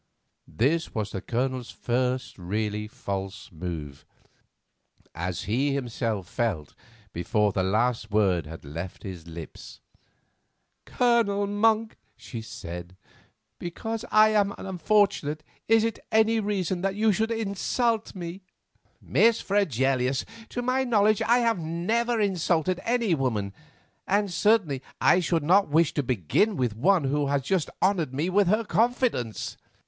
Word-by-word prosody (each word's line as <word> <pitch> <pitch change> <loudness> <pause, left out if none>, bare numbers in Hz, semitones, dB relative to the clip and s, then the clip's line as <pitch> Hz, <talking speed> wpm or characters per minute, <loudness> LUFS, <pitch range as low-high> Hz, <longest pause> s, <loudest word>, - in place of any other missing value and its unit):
This 160 +8 0
was 110 -2 -2
the 95 - -4
Colonel's 125 0 -2
first 125 -1 -2
really 105 +3 -2
false 95 -2 -6
move, 80 -5 -6 1.1
as 85 +1 -3
he 135 +6 0
himself 115 -7 -2
felt 95 - -2 0.4
before 105 +5 +1
the 95 - 0
last 110 +4 0
word 95 -7 +2
had 80 0 -10
left 85 +6 -7
his 90 -4 -8
lips. 85 -1 -10 1.1
"Colonel 230 -5 +2
Monk," 215 +2 +1 0.2
she 115 0 -7
said, 90 -6 -8 0.6
"because 225 +6 -4
I 215 0 +6
am 205 -2 +2
unfortunate 190 -5 +1 0.2
is 225 0 +5
it 230 -1 -1
any 220 +1 +4
reason 190 -4 -1
that 195 0 -1
you 215 +1 +3
should 220 +3 0
insult 225 +1 -1
me?" 175 +1 -6 0.6
"Miss 230 0 +3
Fregelius, 135 - +1 0.2
to 245 - -4
my 255 +2 +1
knowledge 215 -4 +3
I 235 +2 +4
have 230 -5 +1
never 220 +9 0
insulted 180 -3 +1
any 235 -5 +1
woman; 110 -9 -1 0.5
and 200 -1 +1
certainly 195 - +2 0.2
I - - +5
should 170 -3 0
not 190 +6 +4
wish 160 +1 +3
to 145 - +1
begin 130 - +1
with 120 -5 0
one 175 - +3
who 140 +1 0
has 140 -1 0
just 180 +3 0
honoured 170 -9 +1
me 160 +6 -1
with 200 0 +3
her 215 +5 +2
confidence." 225 - 0
160 Hz, 135 wpm, -26 LUFS, -, 1.1 s, I